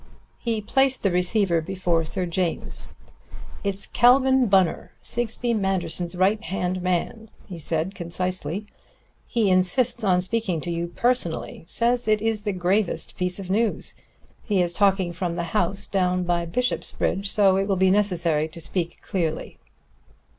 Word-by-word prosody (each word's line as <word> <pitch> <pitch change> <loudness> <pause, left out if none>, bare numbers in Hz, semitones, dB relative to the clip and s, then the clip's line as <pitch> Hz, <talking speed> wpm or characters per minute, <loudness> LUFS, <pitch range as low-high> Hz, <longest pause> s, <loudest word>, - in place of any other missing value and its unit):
He 225 -3 -1
placed 265 +5 +1
the 195 - +2
receiver 180 -1 +2
before 175 -1 0
Sir 180 +3 -2
James. 175 0 -2 0.7
"It's 200 0 -2
Calvin 260 +1 +4
Bunner, 190 -4 +2
Sigsbee 240 0 -2
Manderson's 185 -4 -1
right 200 +5 +2
hand 185 -1 -2
man," 185 +5 -2 0.2
he 180 -4 -8
said 160 +4 -2
concisely. 180 +2 -3 0.6
"He 220 -6 +1
insists 185 +6 +2
on 185 -3 +3
speaking 190 -3 -1
to 175 - -4
you 170 0 -2
personally. 175 -5 -1
Says 240 +3 0
it 215 0 +3
is 220 -1 -1
the 205 - +1
gravest 185 +2 0
piece 180 0 -1
of 190 -2 -6
news. 220 +2 0 0.5
He 205 -4 0
is 175 -1 +1
talking 190 -2 +2
from 170 0 -3
the 170 - -2
house 195 +3 +1
down 180 -2 0
by 175 -1 0
Bishopsbridge, 200 -1 -1
so 200 -2 +4
it 195 0 0
will 195 - +1
be 190 0 +3
necessary 170 -6 +2
to 160 +1 -11
speak 170 +1 -4
clearly." 165 -6 -3
190 Hz, 145 wpm, -24 LUFS, 175-215 Hz, 0.7 s, Calvin